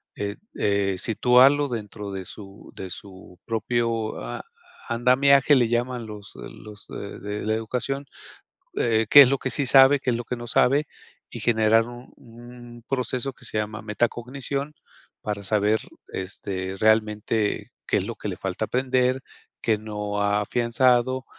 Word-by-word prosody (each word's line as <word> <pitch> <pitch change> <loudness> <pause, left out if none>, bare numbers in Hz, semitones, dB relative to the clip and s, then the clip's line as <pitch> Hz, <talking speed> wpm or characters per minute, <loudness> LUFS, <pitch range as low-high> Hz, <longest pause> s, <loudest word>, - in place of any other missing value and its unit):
eh 100 0 -4 0.2
eh, 100 -2 +1
situarlo 130 +5 +4
dentro 105 -3 -6
de 95 -1 -5
su 100 0 -11
de 95 -1 -7
su 95 -2 -11
propio 115 0 -1
a - - -6 0.4
andamiaje, 135 +4 +4
le 120 -4 +3
llaman 120 0 -1
los 105 -2 -10
los 105 0 -11
de 100 - -8
de 105 +1 -5
la 110 - +2
educación, 125 +5 -3 0.7
eh, 110 -1 +2
qué 145 - +10
es 130 - +7
lo 140 - +1
que 130 - -3
sí 140 -3 +1
sabe, 135 +2 +7
qué 125 - -2
es 120 - +2
lo 120 - -4
que 125 - -4
no 120 0 -8
sabe 140 +5 +3 0.4
y - - -8
generar 115 0 +3
un 120 +1 -11
un 120 0 -13
proceso 130 0 -2
que - - -14
se 110 - -2
llama 105 0 -4
metacognición, 125 +6 -2 0.5
para 105 -1 -4
saber, 105 +2 +2 0.3
este, 95 0 -5
realmente 110 0 +1 0.2
qué - - +1
es - - -1
lo - - -5
que - - -5
le - - -5
falta 95 +3 -3
aprender, 130 +1 +1 0.4
qué 110 -2 +1
no 105 -1 -4
ha 100 0 +2
afianzado, 125 +3 +1
115 Hz, 155 wpm, -24 LUFS, 105-125 Hz, 0.7 s, qué